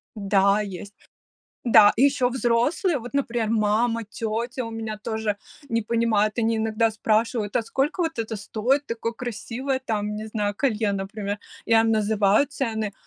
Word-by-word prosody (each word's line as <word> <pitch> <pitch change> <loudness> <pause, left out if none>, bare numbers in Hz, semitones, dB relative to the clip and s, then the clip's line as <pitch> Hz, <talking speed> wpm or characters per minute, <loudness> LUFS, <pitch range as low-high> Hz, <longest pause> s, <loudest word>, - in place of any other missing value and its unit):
Да, 200 0 +3
есть. 200 0 -7 0.7
Да, 210 -3 +7
и 250 - +4
ещё 275 -3 +3
взрослые, 260 - +1
вот, 245 +1 -9
например, 240 -5 0
мама, 225 +2 +1
тетя 230 +4 -3
у 230 - -6
меня 220 -1 -5
тоже 220 -1 -2 0.3
не 230 0 +1
понимают. 215 -1 +1
Они 225 0 +1
иногда 220 +1 +1
спрашивают: 220 0 0
"А - - +1
сколько 270 - -1
вот 325 -3 -3
это 225 -1 -3
стоит, 240 +7 0
такое 230 -1 -3
красивое 245 +3 -4
там, 210 -2 -2
не 215 +1 -5
знаю, 210 -2 -1
колье, 220 -4 0
например?" 200 +1 -4 0.3
Я 225 0 +5
им 225 0 +2
называю 215 +3 +3
цены, 220 -7 -3
225 Hz, 155 wpm, -24 LUFS, 210-240 Hz, 0.7 s, Да